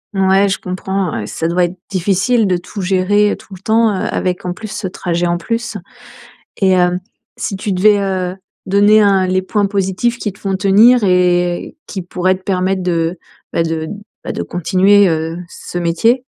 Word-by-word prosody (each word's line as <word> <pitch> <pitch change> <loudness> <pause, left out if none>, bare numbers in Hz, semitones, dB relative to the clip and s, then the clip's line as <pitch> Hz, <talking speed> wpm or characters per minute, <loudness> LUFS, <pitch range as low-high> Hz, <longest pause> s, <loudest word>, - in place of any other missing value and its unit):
Ouais, 195 +1 +3
je 190 - 0
comprends 185 -1 -3
ouais, 105 -2 -4
ça 165 - -3
doit 175 +1 +2
être 180 +2 -6
difficile 195 +4 +1
de 180 -1 +1
tout 195 +3 -7
gérer 195 +3 +2
tout 195 - -15
le 180 - -10
temps, 220 +1 +2
heu, - - -2
avec 180 -1 -2
en 180 -1 -3
plus 215 +3 -8
ce 210 -2 -4
trajet 175 -1 -2
en 175 0 0
plus 230 +3 -3 0.8
et 190 -2 +3
heu, 180 0 +2 0.4
si 205 - -3
tu 205 +2 -4
devais, 205 +3 +4
heu, 185 -2 -2 0.3
donner, 205 +3 +5
heu, 195 -2 +3
les 185 0 +1
points 205 +1 0
positifs 200 +4 -1
qui 210 - -3
te 200 - -21
font 195 -1 -1
tenir 210 +5 +5
et 180 - +1
qui 190 -3 -5
pourraient 180 +1 0
te 185 - -17
permettre 190 0 0
de 170 0 -1 0.4
ben 165 - +1
de 160 -1 -2 0.4
ben - - -3
de - - -3
continuer, 190 +3 +3
heu, 160 +1 -2
ce 175 - -7
métier? 225 +10 +1
190 Hz, 185 wpm, -16 LUFS, 180-205 Hz, 0.8 s, donner